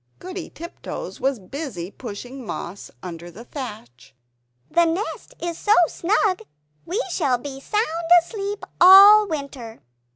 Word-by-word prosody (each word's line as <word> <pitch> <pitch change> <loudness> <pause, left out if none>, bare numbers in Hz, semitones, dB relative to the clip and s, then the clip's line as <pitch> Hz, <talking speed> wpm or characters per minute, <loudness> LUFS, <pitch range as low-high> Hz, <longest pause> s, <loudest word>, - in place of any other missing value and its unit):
Goody 370 -1 -7
Tiptoes 340 +2 -8
was 270 -1 0
busy 200 - -7
pushing 245 +4 -8
moss 200 -3 -7
under 175 -1 -8
the 220 +7 -12
thatch 210 - -9 0.6
"The 340 0 +4
nest 340 +6 -3
is 340 -1 -4
so 420 +1 +3
snug, 380 +2 0 0.5
we 370 +7 -2
shall 280 -8 +1
be 270 +2 -8
sound 425 +8 0 0.4
asleep 405 +1 -5 0.2
all 400 +3 +9
winter." 280 - -6
285 Hz, 125 wpm, -22 LUFS, 230-375 Hz, 0.6 s, all